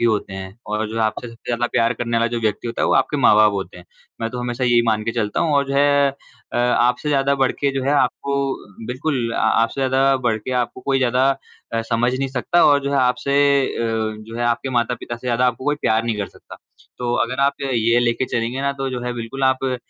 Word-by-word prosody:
ही - - +1
होते 110 -4 0
हैं 95 +1 -8
और 105 +1 -2
जो 115 +1 -4
आपसे 110 +2 -1
सबसे 115 0 -16
ज़्यादा 120 0 0
प्यार 115 +1 +2
करने 115 0 -2
वाला 115 0 +2
जो 120 - -1
व्यक्ति 110 0 -1
होता 115 - -3
है - - +3
वो - - +2
आपके 135 +2 +2
माँ-बाप 110 -5 +5
होते 95 -2 -5
हैं। 90 - -14 0.4
मैं 115 - -1
तो 125 - -6
हमेशा 125 +1 -2
यही 120 -1 +4
मान 110 -1 +1
के 115 - -1
चलता 105 -3 -1
हूँ 165 -3 +1
और 140 -1 +2
जो 140 - -2
है 140 0 +4
अ, 135 - -13
आपसे 125 +3 +2
ज़्यादा 140 -1 +2
बढ़ 135 -2 +1
के 140 - +2
जो 135 - -1
है 135 - +1
अ, 145 - +3
आपको 135 -5 -2
बिल्कुल 125 -1 -2
अ, - - -3
आपसे 115 +4 +1
ज़्यादा 135 +1 +3
बढ़ 120 -4 0
के 110 - -7
आपको 120 - -7
कोई 135 +1 0
ज़्यादा 130 +1 +2 0.4
अ, 115 - 0
समझ 115 +2 0
नहीं 135 0 -1
सकता 130 +6 +2
और 145 -1 +5
जो 140 - -1
है 140 - +2
आपसे 130 +2 +1 0.3
अ, - - -5
जो 110 -1 -3
है 120 - 0
आपके 120 +3 0
माता-पिता 120 -1 -2
से 120 +2 -10
ज़्यादा 125 +1 +2
आपको 125 +1 -2
कोई 145 +1 +1
प्यार 110 +1 +1
नहीं 115 -2 -1
कर 100 - -3
सकता। - - -14 0.4
तो 120 -1 -1
अगर 125 +3 -4
आप 140 +1 +3
ये 120 -3 +2
लेके 120 +1 +1
चलेंगे 120 +2 -2
ना 140 0 0
तो 135 -1 -4
जो 125 -1 -4
है 125 - -2
बिल्कुल 120 +3 -6
आप 130 0 +2
अ, 130 -1 0
120 Hz, 250 wpm, -20 LUFS, 115-135 Hz, 0.4 s, माँ-बाप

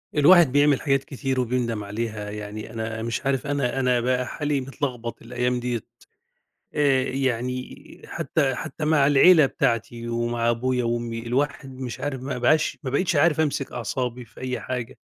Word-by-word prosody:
الواحد 165 0 +7
بيعمل 145 0 +4
حاجات 135 -2 +1
كتير 135 -1 -3
وبيندم 120 -3 -1
عليها. 105 0 -4
يعني 105 +1 -7
أنا 110 0 -4
مش 115 +3 -3
عارف 135 0 0
أنا 140 -2 0
أنا 125 -1 +2
بقى 125 +1 0
حالي 145 -1 -1
متلغبط 130 -3 -4
الأيام 125 +1 -1
دِيَّة. 120 -2 -2 0.9
آآ 140 -3 +3
يعني 130 -1 -2 0.2
حتّى 140 -4 0
حتّى 150 +4 -5
مع 150 -2 +4
العيلة 150 +2 +7
بتاعتي 115 -1 -1
ومع 120 0 0
أبويا 125 +1 0
وأمي 115 0 -2
الواحد 135 +2 -1
مش 125 -3 -5
عارف 135 -3 -3
ما 135 -1 -3
بقاش 155 +6 +2
ما 135 - -3
بقيتش 170 +5 +1
عارف 160 +2 +4
أمسك 140 -3 -1
أعصابي 125 +1 -3
في 115 0 -17
أي 130 0 -3
حاجة. 125 -2 -5
125 Hz, 160 wpm, -24 LUFS, 120-140 Hz, 0.9 s, الواحد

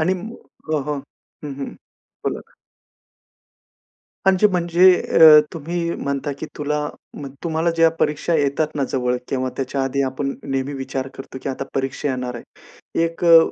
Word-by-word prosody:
आणि 180 +4 +2
म 210 +5 -7 0.4
हो, 155 -1 +1
हो. 150 - -1 0.5
हं, 145 -2 -5
हं. 140 - -5 0.5
बोला - - -1
ना. - - -28 1.7
म्हणजे 190 +2 +5
म्हणजे 180 -1 +5 0.3
अ, 155 -2 +10
तुम्ही 165 +2 -4 0.2
म्हणता 140 +1 -2
की - - -4
तुला 150 0 -1 0.6
तुम्हाला 165 0 0
ज्या 165 0 +5
परीक्षा 150 +3 0
येतात 150 +1 0
ना 140 - 0
जवळ 125 -1 +1
किंवा 130 -1 -1
त्याच्या 135 +1 -1
आधी 135 +1 0
आपण 135 +1 -2
नेहमी 135 0 -2
विचार 135 -1 -4
करतो 135 0 -9
की - - -2
आता 135 0 -3
परीक्षा 135 +2 -1
येणार 125 -2 -3
आहे. 120 - -8 0.6
1 165 +1 -3
अ, 165 -1 +9
145 Hz, 155 wpm, -21 LUFS, 135-165 Hz, 1.7 s, अ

